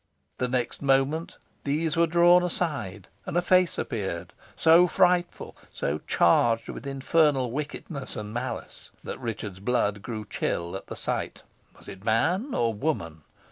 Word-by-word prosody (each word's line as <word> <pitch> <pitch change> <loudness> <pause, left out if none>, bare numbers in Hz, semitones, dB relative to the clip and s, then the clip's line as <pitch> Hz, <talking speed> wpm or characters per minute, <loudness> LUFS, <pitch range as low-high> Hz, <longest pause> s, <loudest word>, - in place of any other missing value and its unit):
The 125 - +1
next 125 -1 -2
moment 140 +4 +1 0.3
these 150 +2 0
were 170 0 +3
drawn 175 +2 +6
aside, 140 - -2 0.2
and - - -1
a - - +4
face 180 0 +3
appeared, 95 -7 -4 0.2
so 165 +2 +6
frightful, 180 -1 +1 0.2
so 75 +2 -2
charged 115 +6 +3
with - - -7
infernal 135 -2 +2
wickedness 140 0 -5
and 105 0 -6
malice, 125 +2 -5
that - - -6
Richard's 105 -6 -5
blood 105 -2 0
grew 110 -1 -5
chill 85 -3 -3
at 95 - -7
the - - -6
sight. - - -3 0.3
Was - - -17
it 95 0 -10
man 175 - +1
or 115 -1 +1
woman? 95 - -3
130 Hz, 145 wpm, -26 LUFS, 105-165 Hz, 0.3 s, drawn